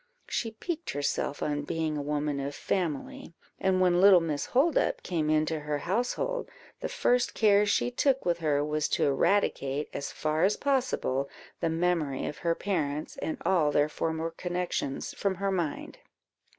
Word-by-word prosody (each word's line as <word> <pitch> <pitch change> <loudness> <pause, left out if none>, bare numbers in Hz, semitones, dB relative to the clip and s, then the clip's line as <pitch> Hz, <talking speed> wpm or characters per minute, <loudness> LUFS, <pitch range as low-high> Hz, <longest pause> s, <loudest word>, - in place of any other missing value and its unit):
She 230 - -1
piqued 330 +9 -5
herself 145 0 -1
on 145 -1 -1
being 160 +1 -2
a 145 - -2
woman 145 0 -1
of 140 +1 -4
family, 170 -2 -3 0.2
and 190 -1 +2
when 180 -1 +4
little 195 -2 +8
Miss 155 -4 -2
Holdup 285 +5 +2
came 160 -4 -1
into 155 +1 +1
her 150 0 -2
household, 245 - -1 0.3
the - - -3
first 250 - +1
care 210 -1 +4
she 245 - +1
took 270 +1 +1
with 170 -1 +1
her 145 -3 +1
was 150 0 0
to - - +1
eradicate, 140 -2 +1
as 140 - -4
far 155 +1 -1
as 200 +3 +3
possible, 250 - 0 0.3
the 165 - 0
memory 165 -4 0
of - - -5
her 170 -1 +1
parents, 155 -7 -2
and 160 - -3
all 170 -5 +3
their 145 +1 +3
former 160 +1 -2
connections, 175 -5 -3
from 195 -1 -1
her 195 +2 -1
mind. 170 -6 -3
165 Hz, 165 wpm, -29 LUFS, 150-200 Hz, 0.3 s, little